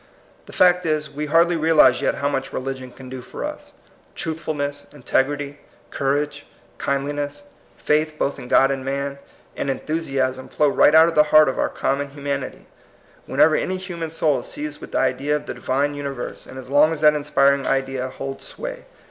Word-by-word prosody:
The - - -11
fact 180 0 +4
is, 155 -2 -1
we 150 +1 -4
hardlj 165 +2 +3
realize 155 -6 +5
yet - - +1
how 140 - -1
much 135 -1 -2
religion 130 -1 -5
can 130 +1 -13
do 130 0 -7
for - - -6
us. - - -8 0.4
Truthful 160 -1 -4
ness, 145 0 -4
integrity, 145 +1 -1 0.3
courage, 145 +1 -1 0.3
kindliness, 145 - -2 0.3
faith 155 +1 +1
both 140 - -1
in 125 - -9
God 135 +2 +4
and 135 -1 -3
man, 140 +1 -3 0.4
and - - -3
enthusiasm 135 -3 -2
flow 150 - +2
right 150 - +5
out 160 +1 +8
of 170 - -1
the 150 -1 +5
heart 155 0 +7
of 135 - -2
our - - +1
com 135 +1 -1
mon 145 0 -3
humanity, 140 -2 -5 0.6
whenever 155 -1 +4
any 185 - -1
human 175 -3 -5
soul 155 -4 +1
is - - -9
seized 150 0 -6
with - - -10
the - - +1
idea 135 +3 +1
of 150 0 -4
the - - -5
Divine 140 +3 -1
uni 145 -1 -4
verse, 130 -3 -7
and 130 - -10
as 130 - -9
long 145 +4 +4
as 160 -2 -4
that 150 -1 +6
inspiring 140 -2 +2
idea 135 -1 -1
holds 135 +1 -7
sway. - - -7
145 Hz, 190 wpm, -22 LUFS, 135-155 Hz, 0.6 s, out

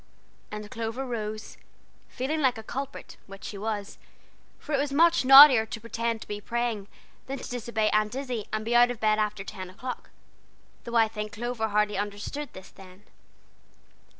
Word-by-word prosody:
and 210 0 -7
Clover 230 +4 -4
rose, 215 -3 -5 0.5
feeling 300 +5 -2
like 255 -4 +2
a 220 - -8
culprit, 275 +4 -6
which 195 0 -12
she - - -6
was, 210 -1 -4 0.6
for 305 - -7
it 275 - +2
was 285 0 -1
much 335 +3 +4
naughtier 270 -3 +10
to 225 - -6
pretend 230 0 -3
to - - -10
be 205 0 -5
praying 235 -3 -2 0.4
than 270 +1 -4
to - - -8
disobey 235 -3 -1
Aunt 215 +2 +1
Izzie 255 -5 -4
and 215 0 -2
be 235 - -1
out 240 0 +6
of 245 -3 -5
bed 215 0 +2
after 210 -2 -1
ten 185 -2 -8
o'clock, 250 +7 -7 0.8
though 235 - -5
I 225 -1 +5
think 215 -1 -6
Clover 235 0 -2
hardly 210 -1 +1
understood 205 +8 -4
this 190 0 -11
then. 185 +1 -15
225 Hz, 175 wpm, -27 LUFS, 210-250 Hz, 0.8 s, naughtier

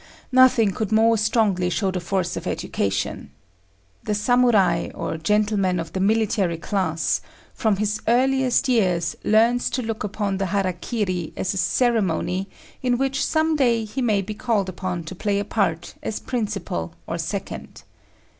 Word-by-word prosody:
Nothing 255 -5 +5
could 215 +2 -3
more 225 +1 +4
strongly 215 -4 +1
show 195 +1 0
the 185 - -2
force 180 0 -2
of - - -5
education. 100 -7 -2 0.7
The 210 - -2
Samurai, 235 -2 +3
or 165 -1 -3
gentleman 205 0 +1
of 165 0 -6
the 190 - -2
military 200 -4 +1
class, 170 -2 -1 0.3
from 220 -3 +1
his 210 +1 -1
earliest 260 +2 +3
years 185 -9 +1
learns 230 +3 +3
to 250 +1 -2
look 225 -1 -3
upon 205 -1 -2
the 195 - 0
hara 190 -1 0
kiri 185 -3 -3
as 185 - -1
a - - -4
ceremony 195 -3 +1 0.3
in 250 -2 +1
which 270 +1 0
some 315 0 +1
day 240 -5 +2
he 215 +5 -4
may 210 -5 +2
be 215 - -5
called 210 -4 0
upon 180 -1 -4
to 160 - -7
play 200 +2 -1
a 200 - -1
part 175 -6 -1
as 220 - -3
principal 200 - -3
or - - -4
second. - - -5
205 Hz, 155 wpm, -23 LUFS, 185-230 Hz, 0.7 s, Nothing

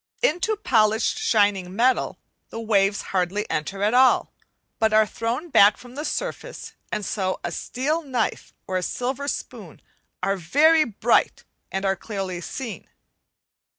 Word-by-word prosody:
Into 430 +2 +2
polished 220 - +2
shining 200 -4 +1
metal 250 +4 +2 0.3
the 225 - -7
waves 200 -3 +1
hardly 190 +3 0
enter 195 +6 -2
at 210 +2 +2
all, 255 +1 +4 0.5
but 220 -1 +2
are 215 0 +6
thrown 235 +10 -3
back 205 -7 +6
from 245 0 -14
the 290 +3 -5
surface; - - -5 0.2
and 210 -1 -2
so 185 -2 -2
a 175 - -3
steel 295 - -2
knife 255 -7 -2
or 185 - -2
a - - -1
silver 255 +8 -3
spoon - - -6 0.4
are 195 0 +1
very 305 - +4
bright, 230 +1 +1 0.3
and 195 +1 -2
are 195 0 +2
clearly 190 -4 -5
seen. 225 - -6
220 Hz, 145 wpm, -24 LUFS, 195-260 Hz, 0.5 s, are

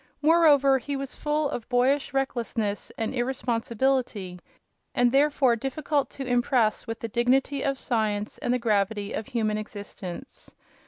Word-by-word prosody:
Moreover, 290 -4 +5
he 280 +4 -4
was 275 -1 -4
full 300 0 0
of 240 -4 -5
boyish 260 +3 +2
recklessness 235 -6 -2
and 225 +2 -2
irresponsibility 240 -5 -1 0.6
and 245 -2 +4
therefore 275 -3 +3
difficult 275 +4 -1
to 270 - -4
impress 245 -3 +1
with 225 0 -4
the 230 - -3
dignity 260 +4 +1
of 275 -1 0
science 215 -4 -1
and 245 - -1
the 250 - +3
gravity 205 -3 0
of 215 - -4
human 215 -3 -1
existence. 205 +1 -9
245 Hz, 140 wpm, -26 LUFS, 220-270 Hz, 0.6 s, Moreover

